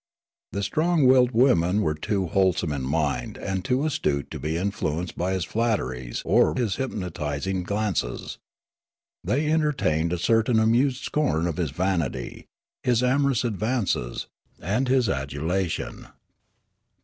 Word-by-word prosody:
The 100 Hz, -, -3 dB
strong 160 Hz, -, +2 dB
willed 125 Hz, -1 st, +6 dB
women 105 Hz, -6 st, +3 dB
were 75 Hz, -, +1 dB
too 95 Hz, +5 st, -1 dB
wholesome 90 Hz, -2 st, +1 dB
in 70 Hz, -2 st, -2 dB
mind 70 Hz, -2 st, -1 dB
and 95 Hz, -1 st, -3 dB
too 130 Hz, +2 st, +1 dB
astute 130 Hz, -, -1 dB
to -, -, -5 dB
be 80 Hz, +4 st, -2 dB
influenced 90 Hz, -3 st, -2 dB
by 90 Hz, +2 st, -1 dB
his 95 Hz, -3 st, -1 dB
flatteries 65 Hz, -, -2 dB
or -, -, +3 dB
his 115 Hz, -7 st, -1 dB
hypnotis 90 Hz, -, -3 dB
ing 95 Hz, -1 st, -1 dB
glances. 100 Hz, -, -2 dB, 0.8 s
They 145 Hz, +4 st, 0 dB
entertained 125 Hz, -, +1 dB
a 90 Hz, -, 0 dB
certain 115 Hz, +5 st, +2 dB
amused 125 Hz, +4 st, +2 dB
scorn 140 Hz, -, 0 dB
of 85 Hz, -3 st, -2 dB
his 85 Hz, -5 st, 0 dB
vanity, 85 Hz, -6 st, -2 dB, 0.3 s
his 125 Hz, -1 st, +2 dB
amorous 135 Hz, -1 st, +2 dB
advances, 110 Hz, -, -1 dB, 0.3 s
and 110 Hz, +10 st, 0 dB
his 130 Hz, -2 st, +3 dB
adulation. 80 Hz, +4 st, -2 dB
95 Hz, 135 wpm, -25 LUFS, 80-125 Hz, 0.8 s, willed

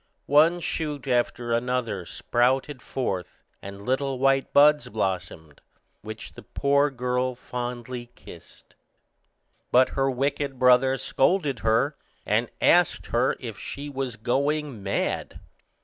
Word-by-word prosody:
One 160 Hz, +5 st, +4 dB
shoot 150 Hz, -4 st, -3 dB
after 120 Hz, -1 st, 0 dB
another 120 Hz, -5 st, -1 dB
sprouted 130 Hz, -, 0 dB
forth, 95 Hz, -9 st, -4 dB, 0.2 s
and 100 Hz, +1 st, -9 dB
little 135 Hz, +1 st, 0 dB
white 135 Hz, +1 st, +2 dB
buds 150 Hz, +1 st, +5 dB
blossomed, 90 Hz, -7 st, -4 dB, 0.4 s
which -, -, -8 dB
the -, -, -11 dB
poor 140 Hz, +1 st, +1 dB
girl 125 Hz, -1 st, -1 dB
fondly 120 Hz, 0 st, -6 dB
kissed. -, -, -15 dB, 1.0 s
But 130 Hz, +1 st, +5 dB
her 135 Hz, 0 st, 0 dB
wicked 140 Hz, +1 st, -1 dB
brother 130 Hz, +1 st, +4 dB
scolded 140 Hz, -2 st, +1 dB
her, 115 Hz, +7 st, +1 dB, 0.3 s
and -, -, +1 dB
asked -, -, +3 dB
her -, -, +2 dB
if -, -, -7 dB
she 145 Hz, +1 st, -6 dB
was 135 Hz, -4 st, -3 dB
going 140 Hz, +2 st, -1 dB
mad. 100 Hz, 0 st, -2 dB
130 Hz, 115 wpm, -25 LUFS, 120-140 Hz, 1.0 s, buds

